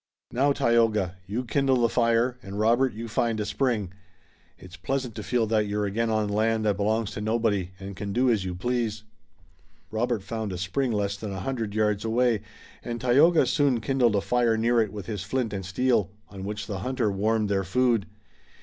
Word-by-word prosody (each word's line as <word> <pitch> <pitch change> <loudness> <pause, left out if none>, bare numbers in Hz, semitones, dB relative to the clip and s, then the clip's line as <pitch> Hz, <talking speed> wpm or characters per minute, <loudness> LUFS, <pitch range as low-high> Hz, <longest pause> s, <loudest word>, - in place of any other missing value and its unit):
Now, 140 +4 +2
Tayoga, 110 -8 +2
you 115 +6 -3
kindle 130 0 +2
the 115 - +4
fire, 120 +1 +1
and 100 +1 -7
Robert, 120 +4 +3
you 115 +1 -5
find 115 0 0
a 105 - -1
spring. 110 -9 -1 0.6
It's 90 -1 -12
pleasant 130 +7 -3
to 110 - -6
feel 120 +1 +1
that 110 -1 +1
you're 105 0 -1
again 115 +3 -1
on 110 -1 +1
land 110 +1 +1
that 105 -2 +1
belongs 110 +1 0
to - - -5
nobody, 110 -4 0
and 100 0 -7
can 100 +2 -5
do 125 +5 +2
as 105 -5 +1
you 90 -1 -4
please." 110 +1 -2 0.9
Robert 110 -1 -1
found 110 -2 -4
a - - -4
spring 95 +9 -1
less 100 -2 -1
than 105 0 -6
a 95 -2 -5
hundred 115 -4 -3
yards 105 -2 +1
away, 115 -1 +2 0.4
and 120 -1 -4
Tayoga 145 +8 +5
soon 140 -5 +2
kindled 120 -1 +2
a 100 - +2
fire 120 -1 +2
near 115 +1 +3
it 110 - -1
with 105 -3 -7
his 105 -4 -4
flint 115 +2 -2
and 95 -1 -3
steel, 110 0 +1 0.2
on 95 -2 -8
which 105 0 -4
the 100 -1 -4
hunter 125 -1 -1
warmed 110 +2 +1
their 100 -1 0
food. 120 -1 +1
110 Hz, 195 wpm, -26 LUFS, 100-120 Hz, 0.9 s, Tayoga